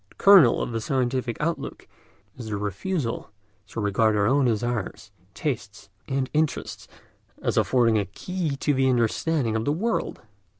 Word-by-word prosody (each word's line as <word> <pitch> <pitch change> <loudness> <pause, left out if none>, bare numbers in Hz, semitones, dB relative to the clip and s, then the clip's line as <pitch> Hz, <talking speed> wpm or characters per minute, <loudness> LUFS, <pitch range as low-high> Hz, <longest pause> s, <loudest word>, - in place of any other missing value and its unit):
The - - -23
kernel 190 -12 +6
of - - -4
the 115 -1 -2
scientific 125 -1 -1
outlook 165 +2 -3 0.5
is 120 -3 -8
the 105 -1 -3
refusal 115 - -3 0.4
to - - -7
regard 105 +1 +2
our 100 -1 +2
own 135 +4 +3
desires, 115 -2 -2 0.2
tastes, 105 -8 -4 0.2
and 135 -1 -1
interests 155 0 -1 0.5
as - - -1
affording 115 -4 +3
a 100 - -1
key 165 - -4
to 145 +2 0
the 130 0 +2
understanding 125 +1 +1
of 110 - 0
the 145 - 0
world. 215 +9 -2
125 Hz, 155 wpm, -25 LUFS, 110-145 Hz, 0.5 s, kernel